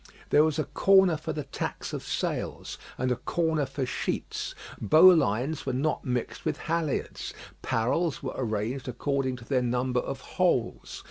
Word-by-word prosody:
There 150 - +6
was 155 -1 +1
a 155 - +1
corner 190 +5 +4
for 155 - -4
the 150 - -3
tacks 135 - -5
of - - -3
sails - - -3 0.2
and 130 0 0
a - - +2
corner 160 +3 0
for 135 0 -3
sheets. - - -3 0.3
Bow 160 - +8
lines 140 - +1
were 130 - 0
not 145 +4 0
mixed 125 -1 -3
with - - -1
halliards; 165 -3 -2 0.3
parrels 135 +9 0
were 130 - -3
arranged 115 +2 -2
according 130 +1 -1
to 120 -2 -11
their 130 0 +1
number 125 +1 0
of 135 +1 -4
holes. 130 -10 -1
135 Hz, 160 wpm, -28 LUFS, 125-155 Hz, 0.3 s, Bow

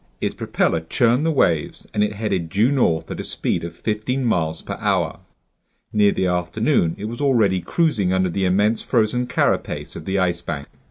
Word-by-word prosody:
Its - - -1
propeller 80 - 0
churned 120 - +2
the 165 - +2
waves 85 - +1
and 105 - +2
it 105 0 -1
headed 100 -6 -2
due 105 - +2
north 85 - +1
at - - -5
a - - -3
speed - - -2
of 85 0 -6
fifteen 115 +5 -2
miles 80 -8 0
per - - -5
hour. - - 0 0.7
Near 105 -1 +4
the 95 - -1
afternoon 90 -2 +1
it 105 - -6
was 120 +5 -5
already 110 -10 +3
cruising 115 - +1
under 95 -1 +1
the 95 +2 0
immense 105 +4 +2
frozen 125 +1 +1
carapace - - -1
of - - -8
the 95 +1 -1
Ice 90 -2 +1
Bank. 70 -4 -5
100 Hz, 185 wpm, -21 LUFS, 90-115 Hz, 0.7 s, Near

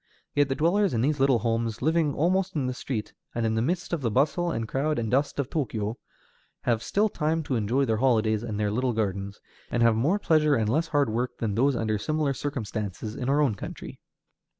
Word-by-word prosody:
Yet 145 -1 +2
the 135 - 0
dwellers 175 +3 +2
in 115 - +1
these 145 +3 +1
little 135 -2 +4
homes, 115 -1 -1
living 160 -1 +2
almost 185 +4 +1
in 140 -4 0
the 125 - -1
street, 125 -3 -4 0.2
and 115 -1 0
in 110 - +1
the 110 - +1
midst 175 +8 -1
of 165 - -1
the 120 - 0
bustle 145 +9 +1
and 115 -9 -2
crowd 150 +6 0
and 115 -2 -2
dust 140 +3 +1
of 140 -3 -1
Tōkyō, 110 -8 -2 0.7
have 115 -2 +1
still 210 - +1
time 160 -4 -1
to 135 - -2
enjoy 120 +5 +1
their 110 -3 +1
holidays 110 -3 +2
and 110 -3 -4
their 105 -1 +1
little 125 +3 0
gardens, 100 -2 -2 0.3
and 120 - +1
have 115 -1 +5
more 145 - +2
pleasure 155 -6 +3
and 110 -2 +1
less 160 +7 +1
hard 145 -7 +1
work 120 +3 -2
than 110 -3 -2
those 130 +5 +2
under 110 -2 -1
similar 155 +4 0
circumstances 110 -6 -4
in 125 - -3
our 145 +2 +3
own 135 -7 +3
country. 100 - -8
130 Hz, 220 wpm, -26 LUFS, 110-150 Hz, 0.7 s, have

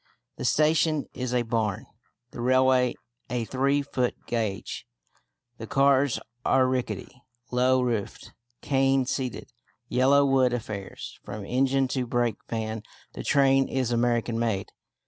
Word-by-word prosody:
The - - -4
station 155 -1 +2
is 125 -1 -3
a 125 -1 +1
barn, 110 -4 -1 0.5
the 120 - -7
railway 130 0 +3 0.3
a 120 -1 -1
three 140 +4 +1
foot 125 -3 -1
gauge, 110 -5 -3 0.7
the 115 - -6
cars 140 0 +3 0.2
are 130 -1 +3
rickety, 125 -1 -3 0.3
low 125 +1 +3
roofed, 115 -5 -3 0.3
cane 135 -1 +2
seated 120 -4 -4 0.4
yellow 135 +3 +4
wood 130 -2 +3
affairs. 105 -5 -6
From 105 -1 -7
engine 135 +3 +2
to 130 -2 -2
brake 120 -3 0
van 110 -1 -3 0.3
the - - -6
train 135 -1 +4
is 130 -2 -1
American 120 -1 +1
made. 110 -5 -1
125 Hz, 125 wpm, -26 LUFS, 115-135 Hz, 0.7 s, yellow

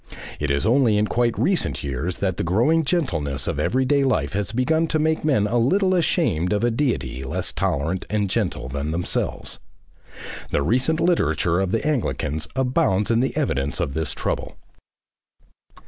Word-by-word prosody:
It 75 - -1
is 70 +5 +1
only 115 -2 +3
in 105 - +2
quite 120 +1 0
recent 185 - 0
years 70 +6 -3
that 95 -3 -1
the - - -1
growing 120 - +2
gentleness 85 - -1
of - - -2
everyday 130 +2 +2
life 130 -7 0
has 100 0 -2
begun 160 +8 +1
to 155 - 0
make 155 +1 0
men 135 -9 +2
a 120 +3 +1
little 185 - +2
ashamed 150 - +1
of 105 - 0
a 120 - +2
Deity 70 - -1
less 65 - -2
tolerant 80 +6 -1
and 105 -1 0
gentle 95 - -2
than 70 +3 -3
themselves. 85 +2 -2 0.9
The 70 - 0
recent 130 - +1
literature 90 - +2
of 95 -1 0
the 115 +8 -1
Anglicans 115 - -1
abounds 120 -6 +1
in 115 - +3
the 130 +4 -1
evidence 70 - -1
of 80 -6 -1
this 80 -3 -1
trouble. - - -3
105 Hz, 165 wpm, -23 LUFS, -, 0.9 s, only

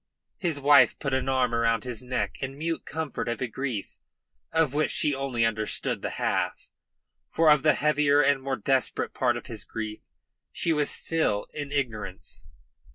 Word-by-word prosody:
His 165 -5 -1
wife 140 -3 +6
put 135 -3 -3
an 130 0 0
arm 130 -2 +1
about 115 -2 +1
his 125 -3 -4
neck 125 -6 -3
in 135 +1 -4
mute 165 +2 -3
comfort 160 -6 -3
of 120 - -2
a 130 - -1
grief 120 -4 -5 0.5
of 160 -4 +2
which 150 +1 +1
she 150 - +1
only 135 -4 0
understood 110 -1 -1
the - - -2
half - - -1 0.6
for 160 -2 +4
of 150 -2 +5
the 150 -1 +4
heavier 145 -1 +3
and 140 -1 +3
more 135 0 -2
desperate 130 +4 0
part 120 -2 +1
of - - -9
his 110 -4 -5
guilt 110 -1 -5 0.5
she 165 - +1
was 150 -1 +1
still 155 -11 0
in 145 -2 -5
ignorance. 105 - -4
135 Hz, 170 wpm, -27 LUFS, 115-145 Hz, 0.6 s, wife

